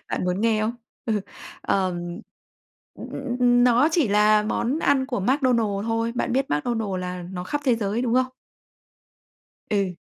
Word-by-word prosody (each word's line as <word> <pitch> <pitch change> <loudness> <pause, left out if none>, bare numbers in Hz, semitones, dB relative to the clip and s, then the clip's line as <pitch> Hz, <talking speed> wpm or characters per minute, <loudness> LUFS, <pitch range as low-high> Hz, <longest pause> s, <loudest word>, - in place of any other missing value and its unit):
Bạn - - -2
muốn 180 +2 -1
nghe 220 -1 +2
không? 220 +2 -1 0.3
Ừ, 215 -3 +1 0.4
ờm, 185 -2 0 1.0
ừm, - - -9
ừ, - - -6
ừm, 255 -3 -3
ừm 245 0 +5
nó 250 +4 +4
chỉ 315 -8 +2
là 210 +1 +4
món 235 +7 -1
ăn 270 -4 +2
của 245 -6 -2
McDonald 230 -4 +1
thôi. 230 0 0
Bạn 245 - -1
biết 270 +2 0
McDonald 220 +8 -1
là 180 0 -5
nó 180 0 -6
khắp 290 +10 -2
thế 255 -4 +4
giới, 215 +2 -1
đúng 240 -2 0
không? 255 0 +3 1.4
Ừ. 195 -4 0
225 Hz, 170 wpm, -24 LUFS, 200-250 Hz, 1.4 s, ừm